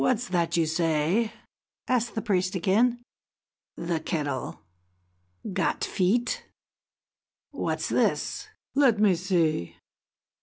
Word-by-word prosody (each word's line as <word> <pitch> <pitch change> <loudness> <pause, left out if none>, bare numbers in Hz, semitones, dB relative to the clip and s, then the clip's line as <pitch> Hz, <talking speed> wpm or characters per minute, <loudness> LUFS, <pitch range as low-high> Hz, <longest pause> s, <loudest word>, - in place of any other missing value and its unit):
what! 255 - +4
What's 245 -1 -5
that 170 -2 +1
you 165 - +3
say?" 165 +6 +1 0.6
asked 240 -1 0
the 220 - -2
priest 185 -3 +1
again. 230 +7 +2 0.7
"The 170 -1 -1
kettle 145 -5 -3 0.9
got 190 - 0
feet! 215 +6 +1 1.1
What's - - -2
this! - - 0 0.3
Let 270 -5 +4
me 210 -3 +5
see!" 170 - 0
185 Hz, 105 wpm, -27 LUFS, 165-230 Hz, 1.1 s, me